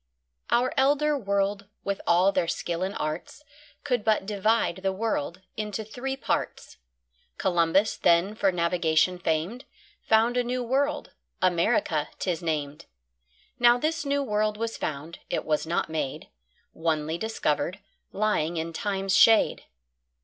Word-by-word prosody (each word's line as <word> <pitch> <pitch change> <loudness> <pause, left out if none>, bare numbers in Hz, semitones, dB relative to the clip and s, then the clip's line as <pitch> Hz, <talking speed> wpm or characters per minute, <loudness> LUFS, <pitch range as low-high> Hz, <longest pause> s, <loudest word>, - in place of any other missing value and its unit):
Our 245 +2 +2
Elder 290 +2 +3
World, 200 -4 -1 0.2
with 200 0 -2
all 180 +3 +4
their 170 - 0
Skill 170 0 -3
and 190 +2 -2
Arts, 155 - -5 0.4
Could 245 -6 0
but 215 -3 +2
divide 210 -1 +1
the 190 0 -1
World 190 -4 -2
into 215 0 -3
three 265 +5 -4
Parts: - - -3 0.6
Columbus, 175 +3 +2
then 175 +4 +3
for 200 -3 +2
Navigation 170 0 +1
fam'd, 175 - -1 0.4
Found 225 +3 +3
a 245 - +3
new 250 +1 -2
World, 275 +5 -1 0.3
America 175 -3 +1
'tis 175 -3 -2
nam'd; 150 -3 -3 0.7
Now 240 0 +6
this 320 +5 -1
new 280 0 0
World 210 -2 0
was 230 +1 -3
found, 155 +3 -5
it - - -2
was 155 0 0
not 170 - 0
made, 155 -4 -4 0.4
Onely 160 0 -1
discovered, 190 -6 -1 0.3
lying 185 -6 0
in 165 +1 -3
Time's 195 0 -1
shade. 225 +1 +5
195 Hz, 135 wpm, -26 LUFS, 170-230 Hz, 0.7 s, Now